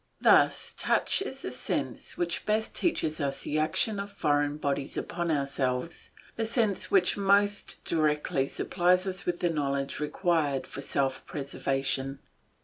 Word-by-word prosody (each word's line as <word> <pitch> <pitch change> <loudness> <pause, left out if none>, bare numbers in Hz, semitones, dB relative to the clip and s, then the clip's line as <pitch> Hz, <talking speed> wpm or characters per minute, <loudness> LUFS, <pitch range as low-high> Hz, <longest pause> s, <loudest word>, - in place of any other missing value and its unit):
Thus - - +4
touch - - +1
is 395 - -5
the - - -3
sense - - -3
which 175 -1 -1
best 215 +1 +1
teaches 160 - 0
us 140 -1 -2
the 155 - -1
action 165 +7 +1
of 200 0 -5
foreign 145 -5 +1
bodies 140 -2 -2
upon 170 0 -2
ourselves, 140 0 -1 0.3
the 225 - -1
sense 215 -5 +1
which 185 -1 +3
most 200 +1 +2
directly 150 -4 +1
supplies 180 +4 +2
us 190 0 -4
with 175 0 -1
the 175 - +2
knowledge 140 -3 -1
required 150 -3 0
for 140 - -7
self 135 -1 -1
preservation. 135 -1 -2
155 Hz, 140 wpm, -29 LUFS, 140-190 Hz, 0.3 s, Thus